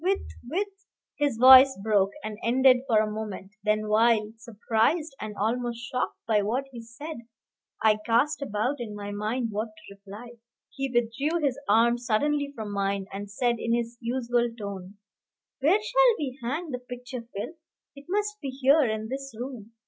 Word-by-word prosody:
with 385 +2 +2 0.3
with 385 +7 0 0.3
" - - -44
His 285 -6 +1
voice 260 +2 +9
broke 205 -3 +3
and 215 0 -6
ended 255 +2 +5
for 225 -4 +3
a 215 0 +2
moment 210 -2 -6
then 215 0 +1
while, 215 0 +3
surprised 230 +7 0
and 215 -1 -5
almost 235 +3 -1
shocked 250 +1 -3
by 215 -2 +3
what 240 +7 -1
he 240 -2 -8
said, 285 +8 -8 0.7
I 215 -1 +4
cast 275 +7 +2
about 250 +2 -1
in 220 -3 -6
my 205 0 -6
mind 220 +4 -2
what 215 +2 -2
to 210 -2 -15
reply, 205 +5 -11 0.3
he 270 0 -3
withdrew 250 +7 0
his 275 -1 0
arm 235 +3 +4
suddenly 285 +5 0
from 215 -2 -5
mine, 200 0 -1
and 200 +1 -6
said 235 +3 0
in 230 +1 +1
his 235 0 -3
usual 240 0 0
tone, 200 -2 -7 0.6
"Where 320 +10 +4
shall - - +4
we 270 -2 -4
hang 295 +7 -3
the 250 - -3
picture, 250 0 -7
Phil? 230 +4 -7 0.4
It 280 0 -13
must 420 +2 -1
be 280 - -4
here 275 +3 +4
in 220 -2 -2
this 270 0 -6
room. 245 -4 -7
235 Hz, 170 wpm, -27 LUFS, 215-270 Hz, 0.7 s, voice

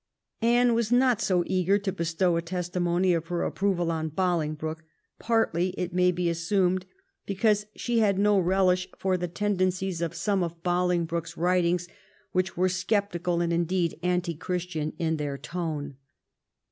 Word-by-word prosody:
Anne 240 +1 +4
was 230 -1 0
not 245 -2 +4
so 180 -4 +2
eager 185 +1 +2
to 200 -1 -2
bestow 170 0 0
a 170 - +1
testimony 175 +1 0
of 165 -1 -2
her 175 0 -1
approval 180 -4 0
on 160 -1 -2
Bolingbroke, 160 -2 -1 0.4
partly, 185 -6 +1
it 180 -1 -3
may 180 0 +4
be 175 0 -1
assumed, 180 +2 +1 0.4
because 210 +1 +1
she 240 -1 0
had 200 -3 +3
no 205 0 +4
relish 185 0 +2
for 190 -1 0
the 180 -1 -2
tendencies 185 -1 -1
of 170 -2 -2
some 200 -3 0
of 170 -1 -4
Bolingbroke's 175 -2 0
writings, 175 0 +1 0.4
which 185 0 -1
were 185 +1 +3
sceptical, 180 -2 0
and, 170 0 0
indeed, 170 0 0
anti 180 -1 0
Christian 170 -2 -3
in 160 -1 0
their 145 -2 -3
tone. 150 -5 -4
180 Hz, 150 wpm, -27 LUFS, 170-190 Hz, 0.4 s, Anne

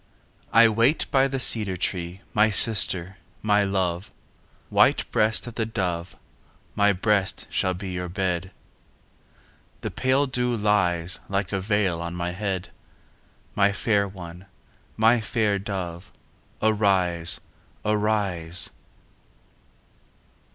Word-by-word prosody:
I 115 +1 +7
wait 115 +7 +2
by 135 0 +4
the 135 0 -3
cedar 105 -7 +2
tree, 90 +1 -3
My 110 +1 +4
sister, 100 -3 +4 0.3
my 105 -1 +3
love, 95 0 -2 0.6
White - - +3
breast 110 +1 +1
of 120 - -8
the 110 -1 -2
dove, 90 -6 -3 0.6
My 105 0 +3
breast 100 0 0
shall 95 0 0
be 95 +1 -6
your 90 0 -4
bed. 90 -1 -2 1.3
The - - -4
pale 130 +2 +1
dew 125 -2 -1
lies 90 -5 +1
Like 100 0 -2
a 100 - -1
veil 95 -4 0
on 85 0 -5
my 90 0 -3
head. 95 -1 -4 0.8
My 100 0 +3
fair 100 0 +1
one, 90 -1 -11 0.5
my 115 +2 +4
fair 110 -2 0
dove, 95 -2 -6 0.5
Arise, 95 -5 +2 0.5
arise! 100 -5 0
100 Hz, 115 wpm, -24 LUFS, 90-110 Hz, 1.3 s, I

